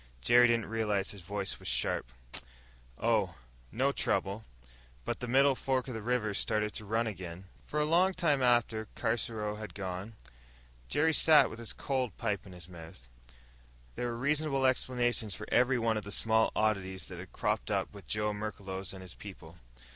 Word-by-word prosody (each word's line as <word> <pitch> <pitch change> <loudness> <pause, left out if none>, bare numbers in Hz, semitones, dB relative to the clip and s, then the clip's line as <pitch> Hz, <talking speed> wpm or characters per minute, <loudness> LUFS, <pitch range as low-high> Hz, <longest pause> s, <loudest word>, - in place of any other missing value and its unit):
Jerry 120 - +6
didn't 115 -2 +2
realize 105 -3 0
his 100 - -9
voice 100 +2 -3
was - - -9
sharp. - - 0 0.9
"Oh, - - +1 0.4
no 135 +4 +2
trouble. 100 -5 0 0.6
But - - -2
the 125 - -4
middle 135 +3 +5
fork 130 0 -1
of 130 - -4
the 110 - -4
river's 110 -3 0
started 105 -1 0
to 105 - -6
run 110 +3 +1
again!" 90 -4 -6 0.2
For 150 - -1
a 150 - +3
long 180 +4 +3
time 150 -7 +2
after 120 -3 +2
Caruso 110 -2 -1
had 105 -1 -8
gone, 95 +2 -5 0.8
Jerry 160 +2 +3
sat 155 0 +6
with 115 - -8
his 115 - -3
cold 130 -6 -2
pipe 105 -4 -2
in 95 - -11
his 90 -2 -10
mouth. 80 -8 -12 0.9
There 120 - -2
were 120 -1 -3
reasonable 140 +1 +1
explanations 120 -4 +1
for - - -7
every 125 +1 +4
one 115 -2 +1
of 105 - -3
the 100 - -8
small 110 +1 +3
oddities 95 -3 0
that - - -7
had - - -9
cropped - - -1
up - - -1
with - - -12
Joe 105 0 0
Merklos 100 -3 -4
and 95 -1 -9
his 90 - -8
people. 85 -5 -11
110 Hz, 175 wpm, -32 LUFS, 100-125 Hz, 0.9 s, Jerry